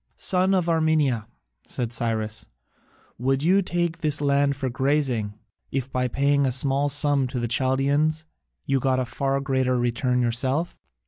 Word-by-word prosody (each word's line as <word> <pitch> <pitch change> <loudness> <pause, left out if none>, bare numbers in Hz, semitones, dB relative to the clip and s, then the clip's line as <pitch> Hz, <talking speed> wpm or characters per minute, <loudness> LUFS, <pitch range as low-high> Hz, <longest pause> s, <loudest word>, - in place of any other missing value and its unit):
"Son 185 +1 +2
of 180 -2 0
Armenia," 155 -8 +1 0.4
said 120 -1 -3
Cyrus, 110 -2 -2 0.7
"would 135 +3 0
you 190 +4 +4
take 175 -2 -2
this 150 -2 0
land 140 -1 +2
for 135 -1 -3
grazing, 130 -5 0 0.4
if 135 -1 -3
by 125 0 0
paying 140 +2 +1
a - - 0
small 140 +2 +1
sum 145 -1 +3
to 125 0 -4
the 120 - -1
Chaldaeans 140 +6 +1 0.4
you 135 -1 +1
got 130 0 +1
a 130 - -1
far 135 +2 -1
greater 130 -2 0
return 125 +1 0
yourself?" 130 +8 -1
135 Hz, 150 wpm, -24 LUFS, 125-145 Hz, 0.7 s, you